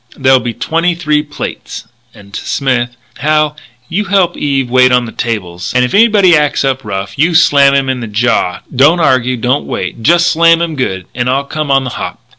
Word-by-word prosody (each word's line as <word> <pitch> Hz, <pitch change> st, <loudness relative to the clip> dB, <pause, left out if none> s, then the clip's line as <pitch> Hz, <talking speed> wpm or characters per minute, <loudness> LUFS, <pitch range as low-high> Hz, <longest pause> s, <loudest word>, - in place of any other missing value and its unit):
"There'll 130 Hz, -1 st, +3 dB
be 120 Hz, -1 st, -5 dB
twenty 165 Hz, +7 st, -1 dB
three 150 Hz, -3 st, 0 dB
plates." 145 Hz, -5 st, -8 dB, 0.2 s
And 100 Hz, -2 st, -17 dB
to -, -, -5 dB
Smith: 125 Hz, -3 st, -2 dB, 0.2 s
"Hal 150 Hz, +1 st, +1 dB, 0.3 s
you 205 Hz, +5 st, -2 dB
help 190 Hz, -3 st, +1 dB
Eve 135 Hz, -3 st, -1 dB
wait 130 Hz, +1 st, +3 dB
on 125 Hz, -1 st, +2 dB
the 115 Hz, -, -8 dB
table. 95 Hz, -9 st, -4 dB
And 125 Hz, 0 st, +3 dB
if 125 Hz, -, -5 dB
anybody 205 Hz, -5 st, +4 dB
acts 150 Hz, -2 st, +1 dB
up 135 Hz, 0 st, -1 dB
rough 100 Hz, -1 st, -6 dB
you 165 Hz, +3 st, +2 dB
slam 140 Hz, -4 st, +4 dB
him 135 Hz, -1 st, +1 dB
on 130 Hz, -1 st, -2 dB
the 115 Hz, -, -6 dB
jaw 105 Hz, -4 st, -1 dB
don't 150 Hz, +7 st, +4 dB
argue, 130 Hz, -5 st, +1 dB
don't 125 Hz, +5 st, -1 dB
wait 95 Hz, +5 st, -5 dB
just 175 Hz, +8 st, +3 dB
slam 165 Hz, 0 st, +4 dB
him 170 Hz, -2 st, -2 dB
good, 95 Hz, -, -3 dB
and 125 Hz, 0 st, -2 dB
I'll 135 Hz, +2 st, 0 dB
come 155 Hz, 0 st, -4 dB
on 135 Hz, -1 st, +2 dB
the 125 Hz, -, -5 dB
hop." -, -, -6 dB
135 Hz, 205 wpm, -12 LUFS, 120-155 Hz, 0.3 s, anybody